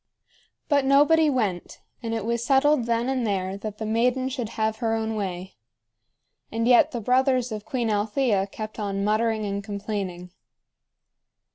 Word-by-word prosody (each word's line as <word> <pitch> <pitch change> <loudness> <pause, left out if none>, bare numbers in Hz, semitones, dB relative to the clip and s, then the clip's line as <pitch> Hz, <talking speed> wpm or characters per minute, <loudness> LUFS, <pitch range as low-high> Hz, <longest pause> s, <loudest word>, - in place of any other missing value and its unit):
But 285 -2 +3
nobody 295 +4 +4
went, 210 -10 -2 0.2
and 230 -2 -4
it 220 -2 -3
was 235 0 -1
settled 270 0 +3
then 235 +1 0
and 260 -2 0
there 190 -3 -1
that 210 0 -6
the 220 - -4
maiden 250 +4 +1
should 245 -5 -4
have 220 0 0
her 225 -2 0
own 220 0 -2
way. 190 -3 -4 1.0
And 230 +1 -1
yet 245 -1 +6
the 240 - -4
brothers 255 +1 +2
of 215 -1 -5
Queen 235 -1 -1
Althea 210 -1 +1
kept 215 +2 -7
on 200 -1 -2
muttering 215 +1 +1
and 200 0 -3
complaining. 200 -3 -5
225 Hz, 155 wpm, -25 LUFS, 205-250 Hz, 1.0 s, yet